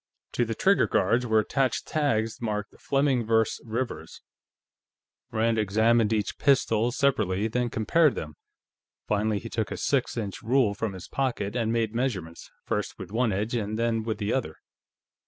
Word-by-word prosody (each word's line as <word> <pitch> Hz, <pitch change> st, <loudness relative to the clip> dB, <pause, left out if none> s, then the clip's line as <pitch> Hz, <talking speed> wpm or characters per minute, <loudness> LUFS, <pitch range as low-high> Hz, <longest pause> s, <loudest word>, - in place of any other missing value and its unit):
To 120 Hz, -, +1 dB
the 115 Hz, 0 st, -3 dB
trigger 200 Hz, +1 st, +3 dB
guards 120 Hz, +6 st, +2 dB
were 110 Hz, -1 st, +3 dB
attached 130 Hz, +3 st, +1 dB
tags 115 Hz, -8 st, 0 dB
marked 105 Hz, -2 st, -3 dB
Fleming 135 Hz, -3 st, +1 dB
vs. 110 Hz, 0 st, +1 dB
Rivers. 120 Hz, +3 st, -5 dB, 1.1 s
Rand 115 Hz, 0 st, +1 dB
examined 110 Hz, +2 st, +3 dB
each 105 Hz, -3 st, -1 dB
pistol 120 Hz, -4 st, +3 dB
separately, 110 Hz, -7 st, +1 dB
then 120 Hz, +2 st, -1 dB
compared 145 Hz, +8 st, +2 dB
them. 75 Hz, -1 st, -5 dB, 0.7 s
Finally, 105 Hz, 0 st, +1 dB
he 115 Hz, +3 st, -6 dB
took 110 Hz, -2 st, -2 dB
a -, -, -5 dB
six 130 Hz, -3 st, 0 dB
inch 100 Hz, -5 st, -4 dB
rule 120 Hz, -3 st, +2 dB
from 105 Hz, 0 st, -3 dB
his 95 Hz, -2 st, -9 dB
pocket 125 Hz, -7 st, -2 dB
and 115 Hz, -2 st, 0 dB
made 115 Hz, -2 st, 0 dB
measurements, 100 Hz, -10 st, -3 dB, 0.2 s
first -, -, -2 dB
with -, -, -8 dB
one 115 Hz, +1 st, +1 dB
edge 105 Hz, +5 st, -2 dB
and 110 Hz, -2 st, -2 dB
then 115 Hz, -1 st, +1 dB
with 110 Hz, 0 st, -3 dB
the 105 Hz, 0 st, -1 dB
other. 115 Hz, -12 st, -2 dB
115 Hz, 160 wpm, -27 LUFS, 105-125 Hz, 1.1 s, trigger